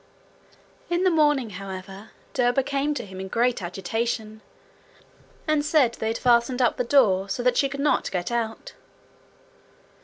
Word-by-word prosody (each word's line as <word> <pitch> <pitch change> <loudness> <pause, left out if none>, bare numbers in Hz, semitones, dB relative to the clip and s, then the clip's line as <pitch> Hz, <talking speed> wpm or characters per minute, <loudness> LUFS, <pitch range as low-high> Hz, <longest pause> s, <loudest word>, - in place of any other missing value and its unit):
In 345 +1 +1
the 370 - +4
morning, 295 -7 +2
however, 195 +2 -8 0.2
Derba 250 +1 +2
came 285 +2 -1
to - - -4
him 190 -1 -10
in 190 - -5
great 235 +2 +1
agitation, 215 +4 -3 1.1
and 310 -1 +2
said 290 -6 +3
they 220 - -4
had 225 +1 -1
fastened 245 +1 +2
up 245 - +2
the - - 0
door, 210 -7 +3
so 245 +5 -2
that 250 0 +3
she 275 - +2
could 280 0 -6
not 290 +1 +1
get 180 +3 -3
out. 235 - -3
240 Hz, 155 wpm, -24 LUFS, 205-275 Hz, 1.1 s, the